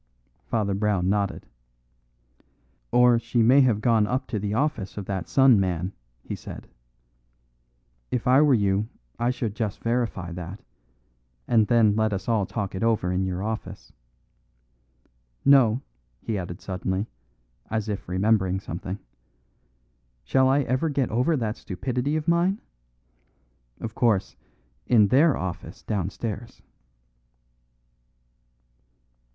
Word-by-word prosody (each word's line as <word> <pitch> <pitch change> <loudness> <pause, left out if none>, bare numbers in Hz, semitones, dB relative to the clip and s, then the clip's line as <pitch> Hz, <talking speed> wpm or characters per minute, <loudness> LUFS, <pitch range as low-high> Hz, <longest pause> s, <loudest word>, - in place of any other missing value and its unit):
Father 105 -3 0
Brown 100 -2 +1
nodded. 100 -1 -1 1.5
"Or, 125 -1 +5
she 115 0 +1
may 130 +5 +6
have 120 -5 +2
gone 115 -3 +3
up 130 +3 -1
to 105 - -2
the 105 +1 -2
office 125 -9 -1
of 100 - -4
that 95 -2 -3
sun 135 -5 +5
man," 90 -1 -1 0.3
he - - -6
said. - - -9 1.4
"If 125 - -2
I 130 +3 +5
were 145 -3 +5
you 100 0 +1 0.3
I 120 - +1
should 125 -4 -2
just 110 -3 -4
verify 115 -7 -1
that, 90 +3 -7 0.8
and 110 -3 +3
then 115 -4 +4
let 110 -1 +1
us 95 - -4
all 110 -5 +1
talk 100 -4 -4
it 95 - -4
over 110 -6 +1
in 95 +1 0
your 95 +1 -3
office. 105 -3 -6 1.5
No," 135 -3 +5 0.4
he 110 - -3
added 90 -1 -5
suddenly, 95 +1 -2 0.6
as 110 0 -2
if 100 -4 -4
remembering 95 0 +2
something, 95 +1 -6 1.3
"shall 130 - +3
I 140 +2 +3
ever 130 +4 0
get 140 -4 -1
over 125 +8 +2
that 110 -3 -2
stupidity 125 - -2
of 155 +1 -2
mine? 175 +4 +2 1.2
Of 110 -2 -5
course, 110 -6 +1 0.5
in 105 -4 +5
their 145 +4 +4
office 90 -2 -6
downstairs." 105 +3 -4
110 Hz, 125 wpm, -25 LUFS, 95-125 Hz, 1.5 s, may